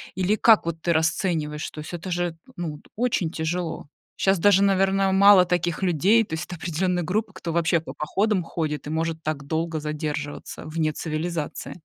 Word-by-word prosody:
Или 190 +3 +1
как 220 -3 +5
вот 165 -1 -4
ты 170 - +1
расцениваешь? 160 -2 0
То - - -10
есть 155 +3 -8
это 175 +2 -5
же, 175 -1 -1 0.2
ну, 160 -4 -4
т - - -25
очень 220 -9 0
тяжело. 165 -1 -3 0.3
Щас 195 -1 +3
даже, 200 +1 +5
наверно, 195 0 +2
мало 195 -1 +7
таких 175 0 -1
людей. 190 +7 +3
То 160 - -9
есть 160 +2 -3
это 175 - -7
определённая 175 +2 -1
группа, 210 +7 -1
кто 165 -1 -5
вообще 170 0 +2
по 160 - -9
походам 195 +4 0
ходит 155 -3 -3
и - - -4
может 160 0 -2
так 150 -3 -3
долго 160 +1 -1
задерживаться 150 -1 -5
вне 155 0 -1
цивилизации. 160 +2 -4
170 Hz, 180 wpm, -24 LUFS, 155-190 Hz, 0.3 s, мало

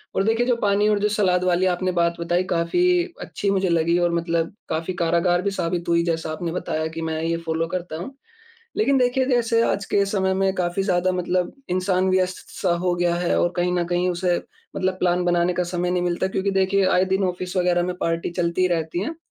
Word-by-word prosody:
और 195 - +2
देखिए 225 +3 +2
जो 245 -1 +2
पानी 205 +1 +2
और 210 -1 +2
जो 210 - +2
सलाद 185 -4 +1
वाली 180 0 +2
आपने 185 +1 -1
बात 170 -1 0
बताई, 175 +2 0
काफ़ी 345 - +2 0.2
अच्छी 200 - -3
मुझे 190 -1 +1
लगी, 170 0 +2
और 175 -1 +2
मतलब 170 0 -1 0.2
काफ़ी 165 +3 -2
कारगर 170 +1 +2
भी 200 +1 -1
साबित 170 -2 -2
हुई, 170 0 +3
जैसा 165 -2 -2
आपने 165 +1 -4
बताया 160 -2 -2
कि, 165 +1 -6
"मैं 160 -1 -2
ये 165 0 0
फ़ॉलो 165 0 -1
करता 175 -3 -4
हूँ।" 265 +11 -7 0.6
लेकिन 280 -11 +3
देखिए, 255 +1 +2
जैसे 235 -3 +2
आज 200 -3 0
के 200 0 +4
समय 190 -1 0
में 190 0 +1
काफ़ी 180 +1 -1
ज़्यादा 185 -1 +1
मतलब 180 0 -1 0.2
इंसान 185 +1 +1
व्यस्त-सा 185 -1 -1
हो 175 - +2
गया 175 -1 +1
है, 175 0 0
और 175 - +1
कहीं 175 0 +1
न 175 -1 0
कहीं 180 +1 +1
उसे 175 0 0 0.4
मतलब 185 0 0
प्लान 180 0 +1
बनाने 175 0 +2
का 180 - 0
समय 175 0 0
नहीं 180 0 0
मिलता 175 +1 0
क्योंकि 190 +1 -1
देखिए, 195 0 +2
आए 185 0 +3
दिन 190 +1 0
ऑफ़िस 180 0 -4
वग़ैरह 175 -1 +2
में 180 0 -3
पार्टी 165 0 -1
चलती 170 +1 0
ही 185 - +4
रहती 165 -1 -1
है। 320 - -4
180 Hz, 220 wpm, -23 LUFS, 170-190 Hz, 0.6 s, के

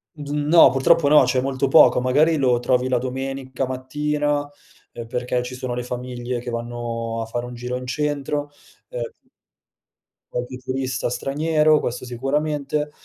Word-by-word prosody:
Uhm, 145 -1 -3
no, 170 +1 +8
purtroppo 145 +3 +3
no, 150 -1 +7
c'è 125 +1 +1
molto 135 0 -1
poco, 135 - +6
magari 150 +6 +3
lo 125 -4 +2
trovi 125 +1 +1
la 125 -1 +2
domenica 130 +1 -4
mattina, 145 +3 -1 0.5
uhm, 115 -1 -7
perché 125 +1 -2
ci 125 +1 -6
sono 125 -1 -4
le 125 - -3
famiglie 125 0 -4
che 120 0 -6
vanno 115 -1 -4
a - - -5
fare 120 +2 -4
un 125 - -8
giro 125 +1 -4
in 125 0 -6
centro 145 +1 -2 0.4
ehm - - -7 1.0
Qualche 125 +1 -4
turista 130 -1 -3
straniero, 155 +3 +2
questo 125 +1 -4
sicuramente, 150 +3 -1
130 Hz, 150 wpm, -22 LUFS, 125-145 Hz, 1.0 s, no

